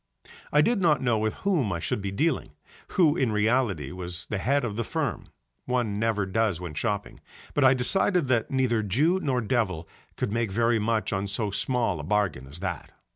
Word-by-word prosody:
I 150 - +5
did 235 0 +1
not 150 -6 +3
know 120 -3 +2
with 110 0 -1
whom 160 - +2
I 85 - -2
should 100 - -2
be 100 - -3
dealing, 150 +13 -1 0.4
who 160 -5 +5
in 130 -9 +1
reality 105 - +1
was 90 -2 -6
the 105 - -3
head 140 +5 +1
of 105 -4 -3
the 115 - -1
firm - - -3 0.4
(one 120 -5 -1
never 110 -3 +1
does 100 -2 0
when 90 -4 -6
shopping) 105 +5 -3 0.3
but 145 - +2
I 130 0 +6
decided 180 +5 +2
that 120 -4 +1
neither 130 -4 +1
Jew 145 - +2
nor 130 -8 0
Devil 100 -8 -1 0.3
could - - -1
make 115 -2 -1
very 115 +2 +2
much 110 0 0
on 100 +1 -1
so 105 +1 -2
small 115 -4 0
a - - -5
bargain 90 -7 0
as 75 +6 -9
that. 90 -6 -4
110 Hz, 195 wpm, -26 LUFS, 100-130 Hz, 0.4 s, I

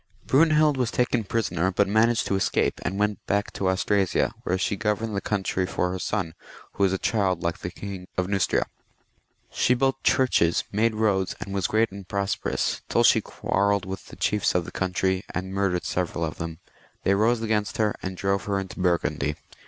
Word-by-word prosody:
Brunehild 155 0 +4
was 125 -3 +1
taken 120 -2 0
prisoner, 95 -4 0
but 100 +2 +2
managed 110 +3 +3
to 100 - 0
escape, 95 - 0
and 95 - -2
went 105 0 0
back 100 +1 0
to 95 - 0
Austrasia, 95 0 +1
where 95 - 0
she 95 - 0
governed 105 +1 -1
the 100 - -1
countiy 95 -3 -1
for 90 - 0
her 95 - -4
son, 90 -2 -2 0.4
who - - -6
was 95 -2 +4
a 95 - 0
child 95 -4 0
like 85 -1 -1
the 90 - -4
King 95 0 -7
of 90 - +1
Neustria. 100 -2 +1 0.9
She 125 - +2
built 135 +1 +1
churches, 85 -10 +3
made 110 +2 +1
roads, 100 -4 +1
and 100 - -6
was 95 -3 0
great 110 0 +2
and 100 -1 -9
prosperous, 100 +1 -1
till - - +3
she - - +5
quarrelled 100 -1 0
with 95 0 -6
the - - -11
chiefs 105 -3 +1
of 90 -2 +1
the - - -8
country, 95 0 0
and 95 +1 -3
murdered 95 -3 0
several 85 -2 -1
of 80 - -6
them. 80 -1 -4 0.5
They 100 - +3
rose 115 +3 +2
against 105 -2 0
her, 105 -1 +2
and 95 -1 -5
drove 95 +1 0
her 100 -1 0
into 95 0 -7
Burgundy. 85 -4 0
100 Hz, 190 wpm, -25 LUFS, 95-110 Hz, 0.9 s, she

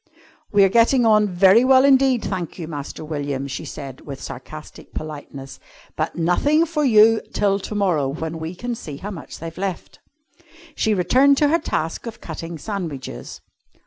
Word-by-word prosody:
"We're 200 -2 +5
getting 235 +4 +4
on 215 -1 +4
very 190 +5 +5
well 260 +1 +5
indeed, 265 -3 +4
thank 180 -5 -4
you, 165 -3 -6
Master 150 0 -7
William," 145 -3 -3
she 130 - -6
said 135 -3 -8
with 140 -2 -8
sarcastic 155 +5 -10
politeness, 145 -3 -8 0.4
"but - - -2
nothing 285 - +2
for 310 -2 -1
you 225 -3 +5
till 200 -1 +1
to 210 - -6
morrow, 175 -9 +1
when 160 +3 -5
we 160 +3 -5
can 245 +6 -4
see 150 -11 -7
how 205 +7 -6
much 165 -7 -9
they've 165 0 -8
left." 195 -3 -5 0.7
She 220 -6 +1
returned 260 +10 +4
to 295 0 +3
her 335 +3 +3
task 165 - -3
of 225 - -7
cutting 165 +1 -7
sandwiches. 155 - -6
185 Hz, 165 wpm, -21 LUFS, 155-230 Hz, 0.7 s, We're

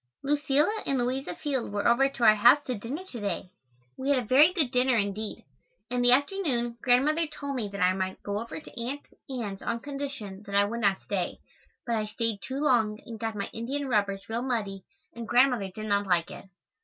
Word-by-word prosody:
Lucilla 295 +8 +2
and 275 - +1
Louisa 255 +2 -2
Field 270 -7 -2
were 205 0 0
over 270 +3 +4
to 260 -3 -5
our 215 -1 +8
house 235 +6 +7
to 255 - -2
dinner 245 - -5
to 250 -10 -8
day. 200 -3 -3 0.5
We 265 +2 -2
had 285 - +4
a 250 - 0
very 275 +9 +6
good 315 -9 0
dinner 250 -1 +3
indeed. 205 +1 -3 0.5
In 250 0 0
the 245 0 +5
afternoon, 260 -5 +1
Grandmother 295 +6 +3
told 285 -2 -5
me 230 -5 -2
that 200 -1 -6
I 180 +1 +4
might 190 0 -3
go 205 0 -2
over 230 +6 -6
to 265 -5 -9
Aunt 275 +4 -4 0.3
Ann's 220 -7 -4
on 235 - -2
condition 275 -8 -6
that 200 - -4
I 200 0 +5
would 230 +3 -3
not 200 -2 +2
stay, 185 -4 -3 0.5
but 235 - -1
I 215 -1 -1
stayed 225 -1 -2
too 265 +5 -4
long 225 -7 +2
and 225 -2 -8
got 225 -1 -3
my 200 - -3
indian 270 +5 -3
rubbers 200 -3 0
real 230 +1 -2
muddy 210 -7 -3 0.3
and 230 -1 -7
Grandmother 245 -6 +3
did 215 +3 -7
not 200 -1 +1
like 175 -2 +1
it. - - -10
235 Hz, 210 wpm, -28 LUFS, 205-270 Hz, 0.5 s, our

